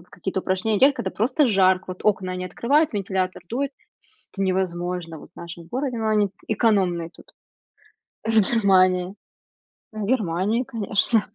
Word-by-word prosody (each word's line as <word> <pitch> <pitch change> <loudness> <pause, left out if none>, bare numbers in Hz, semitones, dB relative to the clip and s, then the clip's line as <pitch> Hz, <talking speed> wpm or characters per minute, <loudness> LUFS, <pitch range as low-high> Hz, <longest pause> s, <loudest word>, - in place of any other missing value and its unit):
в 180 - -26
какие-то 190 +1 -3
упражнения 190 +3 0
делать, 275 +2 +6
когда 190 - -3
просто 260 +9 +1
жарко, 190 -4 +3
вот 185 0 -7
окна 185 -3 +1
они 185 0 -4
открывают, 280 - +1
вентилятор 190 -3 -2
дует, 270 +6 -2 0.6
это 195 - -4
невозможно 180 -3 -2
вот - - -15
в - - -24
нашем 170 0 -9
городе, 255 +4 -3
но 220 -1 -1
они 210 -1 +3
т - - -34
экономные 195 -7 +1
тут, - - -19 0.9
в - - -2
Германии, 185 -3 +3 0.8
в 215 -2 -4
Германии 210 0 0
конечно. 220 -1 0
195 Hz, 155 wpm, -23 LUFS, 185-225 Hz, 0.9 s, делать